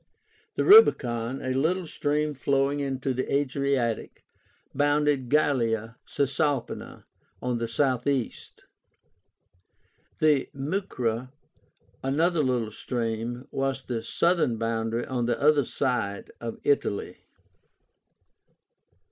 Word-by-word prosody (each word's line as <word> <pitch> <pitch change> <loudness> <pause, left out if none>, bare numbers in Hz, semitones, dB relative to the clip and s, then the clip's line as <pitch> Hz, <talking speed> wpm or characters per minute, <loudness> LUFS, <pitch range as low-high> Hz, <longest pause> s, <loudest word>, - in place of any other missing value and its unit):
The - - +1
Rubicon, 130 - +5
a 130 - -1
little 170 +7 0
stream 150 -1 -1
flowing 140 +1 +1
into 135 -1 -2
the 130 +1 -3
Adriatic, 140 -4 -1 0.5
bounded 145 -2 +1
Gallia 115 -6 +1
Cisalpína 140 -1 -2 0.4
on 125 -1 -2
the 115 - -2
southeast. 130 +1 -1 1.5
The 150 -3 +2
Mucra, 130 - -2 0.7
another 160 +5 +1
little 120 -4 0
stream, 120 +2 -3
was 135 -1 -2
the 120 -3 -3
southern 160 0 +1
boundary 115 +1 -1
on 125 -2 -2
the 120 - 0
other 145 -2 +4
side 120 -7 -2
of 115 -1 -5
Italy. 140 -8 0
130 Hz, 95 wpm, -26 LUFS, 120-145 Hz, 1.5 s, Rubicon